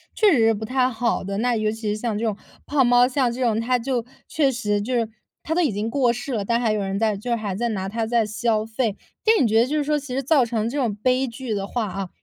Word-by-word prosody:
确 425 -3 +5
实 270 - +4
是 225 - +4
不 215 +1 -5
太 255 +2 +1
好 235 0 -1
的。 195 +1 -3
那 245 +1 +1
尤 215 0 0
其 225 +1 -6
是 - - -3
像 225 -3 -2
这 225 - -3
种 215 -2 -1 0.3
胖 280 -3 +2
猫， 245 0 +6
像 255 -2 +1
这 255 +2 -6
种 225 -3 +2
他 250 +2 +1
就 245 -1 -2 0.2
确 295 -3 +2
实， 210 -5 -1
就 250 +4 -2
是 230 -2 0 0.3
他 320 - -2
都 355 - +1
已 315 - +2
经 210 +2 -2
过 245 -2 +2
世 250 +3 -6
了， 210 -4 -1
但 235 +2 +1
还 230 -3 +2
有 215 - 0
人 195 0 -2
在 215 -2 +1
就 240 +5 -7
是 - - +3
还 210 -4 -3
在 235 +5 -1
拿 195 -3 -3
它 225 +2 -2
在 230 -1 +2
消 220 0 0
费。 225 -2 -1 0.3
但 440 -5 +5
你 - - +3
觉 220 +1 +4
得 240 - +3
就 300 - -2
是 300 - +1
说， 300 +1 +1
其 270 -3 -6
实 270 - -1
造 275 -3 +4
成 225 -1 -1
这 285 - -4
种 235 -7 0
悲 255 +5 +1
剧 240 -1 -5
的 200 -1 -2
话 235 -1 -2
啊， 190 -1 -5
235 Hz, 315 characters per minute, -23 LUFS, 215-255 Hz, 0.3 s, 猫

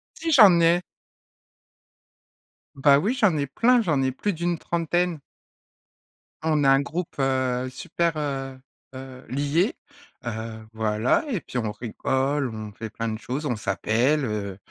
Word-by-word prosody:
Si 325 0 -3
j'en 200 - +8
ai! 170 +2 +4 1.9
Bah 140 0 +5
oui 200 - +1
j'en 210 - +2
ai 140 - 0
plein! 235 - +3
J'en 150 -7 +1
ai 130 0 +1
plus 200 +10 -2
d'une 170 +1 -1
trentaine. 170 0 -1 1.2
On 155 -2 +1
a 135 - +5
un 135 +1 +5
groupe, 165 +4 -5
heu, 130 -1 0
super, 170 +6 -2
heu 135 -3 -4 0.4
heu, 130 -1 -10
lié. 145 - 0 0.5
Heu, 110 -1 -5
voilà 110 - +1
et 215 - -2
puis 125 - -7
on 110 -3 -1
rigole, 130 +4 -1
on 110 -1 -7
fait 110 +2 -7
plein 115 +1 -4
de 110 - -4
choses, 130 +7 -4
on 125 -5 0
s'appelle, 115 - +1
heu. 100 -4 -4
135 Hz, 145 wpm, -24 LUFS, 115-165 Hz, 1.9 s, j'en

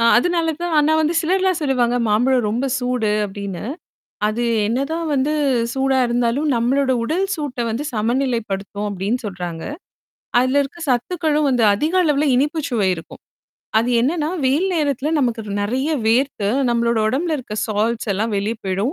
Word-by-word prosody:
அ - - +2
அதனால 330 +3 +1
தான் 350 -1 -2
ஆனா 300 +1 +3
வந்து 315 +2 +1
சிலர்லாம் 370 +1 +1
சொல்லுவாங்க. 245 -4 +1
மாம்பழம் 245 +2 +2
ரொம்ப 240 +5 -1
சூடு 245 -4 0
அப்பிடின்னு. 195 -2 -6 0.7
அது 230 +3 -2 0.2
என்னதான் 275 +9 -1
வந்து 275 +3 +1 0.4
சூடா 265 0 +1
இருந்தாலும் 240 +5 0
நம்மளோட 260 +3 +2
உடல் 360 +9 0
சூட்ட 285 -5 -4
வந்து 250 +7 -3
சமநிலைப்படுத்தும் 220 -4 -1
அப்பிடின்னு 205 +6 -2
சொல்றாங்க. 175 -4 -5 0.8
அதுல 255 +3 +2
இருக்க 280 +5 -6
சத்துக்களும் 300 +4 +1
வந்து 245 -3 +2
அதிக 305 - -1
அளவுல 300 -2 +2
இனிப்புச்சுவை 280 - 0
இருக்கும். 165 - -11 0.6
அது 230 +2 0
என்னன்னா, 300 +5 0 0.2
வெயில் 295 +9 +2
நேரத்தில 285 -3 0
நமக்கு 235 -3 0 0.2
நெறைய 260 +8 -1 0.2
வேர்த்து 230 -3 +1 0.2
நம்மளோட 235 -1 +1
உடம்புல 310 +7 0
இருக்க 225 -4 -7
சால்ஸ் 220 +2 -1
எல்லாம் 215 +2 -1
வெளிய 210 +3 -1
போயிடும். 195 +8 -1
250 Hz, 145 wpm, -20 LUFS, 225-295 Hz, 0.8 s, ஆனா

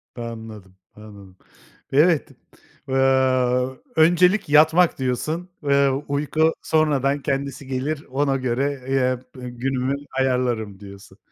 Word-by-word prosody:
Anladım, 110 -5 -9 0.2
anladım. 100 -3 -14 0.5
Evet. 155 +3 +3 0.6
Eee, 130 - -2 1.0
"Öncelik 175 +4 +3
yatmak." 160 +4 +4
diyorsun. 145 +8 -2
Eee, 140 -1 +3 0.2
"uyku 150 +3 +1
sonradan 145 -3 +1
kendisi 140 0 -3
gelir 140 +3 -3
ona 135 +1 0
göre, 130 +1 -2
eee, 130 -2 +1 0.2
b 125 - -6
günümü 130 +2 -2 0.2
ayarlarım." 120 -6 -1
diyorsun. 100 -1 -13
135 Hz, 100 wpm, -22 LUFS, 120-150 Hz, 1.0 s, yatmak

